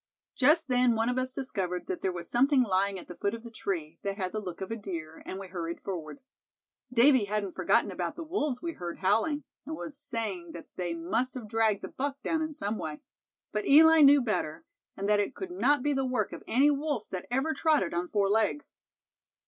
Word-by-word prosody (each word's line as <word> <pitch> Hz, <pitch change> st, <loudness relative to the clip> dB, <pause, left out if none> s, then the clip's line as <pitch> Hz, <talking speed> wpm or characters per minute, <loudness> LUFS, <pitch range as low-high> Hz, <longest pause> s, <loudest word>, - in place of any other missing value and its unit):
"Just 310 Hz, +4 st, +4 dB
then 250 Hz, -2 st, +3 dB
one 225 Hz, +2 st, +1 dB
of 250 Hz, +1 st, 0 dB
us 255 Hz, 0 st, 0 dB
discovered 190 Hz, -10 st, -1 dB
that 185 Hz, -, -4 dB
there 190 Hz, -, 0 dB
was 170 Hz, -1 st, -6 dB
something 265 Hz, +2 st, +4 dB
lying 195 Hz, -2 st, +1 dB
at 180 Hz, -, -9 dB
the -, -, -7 dB
foot 200 Hz, +2 st, -1 dB
of 230 Hz, -, -10 dB
the 235 Hz, -, -9 dB
tree, 165 Hz, -7 st, -4 dB
that 200 Hz, 0 st, -3 dB
had 185 Hz, -3 st, -2 dB
the 215 Hz, -, -2 dB
look 180 Hz, -5 st, -7 dB
of 190 Hz, +2 st, -5 dB
a -, -, -1 dB
deer, 170 Hz, -7 st, -7 dB
and 190 Hz, -, -4 dB
we 195 Hz, -, -7 dB
hurried 170 Hz, -2 st, -4 dB
forward. 180 Hz, -, -6 dB, 0.7 s
Davy 255 Hz, -1 st, +5 dB
hadn't 200 Hz, -1 st, -2 dB
forgotten -, -, +2 dB
about -, -, -3 dB
the 335 Hz, -, -6 dB
wolves 305 Hz, -7 st, -2 dB
we 340 Hz, -, -2 dB
heard 175 Hz, -, -6 dB
howling, 225 Hz, +11 st, +1 dB, 0.2 s
and 315 Hz, -, -5 dB
was 305 Hz, -, -7 dB
saying 220 Hz, -, -4 dB
that 170 Hz, -, -10 dB
they 175 Hz, -2 st, -2 dB
must 225 Hz, +11 st, -1 dB
have 240 Hz, -4 st, -6 dB
dragged 220 Hz, -2 st, +1 dB
the -, -, -3 dB
buck 280 Hz, +1 st, -4 dB
down 320 Hz, -1 st, 0 dB
in 315 Hz, 0 st, -2 dB
some 210 Hz, -1 st, -1 dB
way. 155 Hz, -1 st, -5 dB, 0.5 s
But 210 Hz, 0 st, -2 dB
Eli 320 Hz, +2 st, +8 dB
knew 280 Hz, -1 st, +7 dB
better, 160 Hz, -9 st, -2 dB, 0.3 s
and 200 Hz, -, -2 dB
that 210 Hz, 0 st, +4 dB
it 205 Hz, +6 st, -1 dB
could 380 Hz, -2 st, -6 dB
not 290 Hz, -6 st, +2 dB
be 290 Hz, -, +2 dB
the 270 Hz, -1 st, 0 dB
work 250 Hz, -5 st, -1 dB
of -, -, -8 dB
any 275 Hz, +5 st, +4 dB
wolf 285 Hz, -5 st, -2 dB
that 185 Hz, -2 st, -5 dB
ever 270 Hz, +6 st, 0 dB
trotted 305 Hz, -, +2 dB
on 175 Hz, +1 st, -2 dB
four 200 Hz, -2 st, +2 dB
legs. 220 Hz, +8 st, 0 dB
225 Hz, 220 wpm, -29 LUFS, 190-275 Hz, 0.7 s, Eli